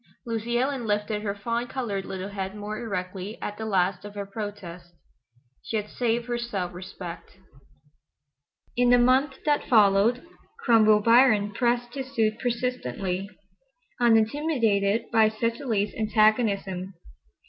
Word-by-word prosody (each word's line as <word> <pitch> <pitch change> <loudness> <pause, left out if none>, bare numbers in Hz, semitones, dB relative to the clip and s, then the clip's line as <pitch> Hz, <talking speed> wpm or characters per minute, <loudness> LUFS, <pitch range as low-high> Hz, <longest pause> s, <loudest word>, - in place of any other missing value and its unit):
Lucy 230 0 -2
Ellen 260 -2 -1
lifted 210 0 -1
her 200 -1 -3
fawn 235 +4 -2
colored 210 -8 -3
little 190 +1 -5
head 195 -1 -5
more 210 +1 -5
erectly 195 -1 -5
at 205 +1 -6
the 220 - -4
last 185 -2 +1
of 205 0 -10
her 200 -1 -4
protest. 195 -5 -8 0.7
She 225 - -3
had 210 0 -4
saved 235 -1 -1
her 240 -1 -2
self 195 -7 -3
respect. 180 -1 -9 1.4
In 245 0 +3
the 245 - +6
month 260 +3 +3
that 295 -1 +1
followed 215 +3 +4 0.4
Cromwell 215 -3 +5
Biron 230 -3 +4
pressed 240 +1 0
his 265 -1 -6
suit 220 -1 +1
persistently, 200 - -2 0.7
unintimidated 225 -3 +2
by 220 -1 +5
Cecily's 225 -1 -1
antagonism. 210 -4 +1
215 Hz, 125 wpm, -26 LUFS, 200-240 Hz, 1.4 s, the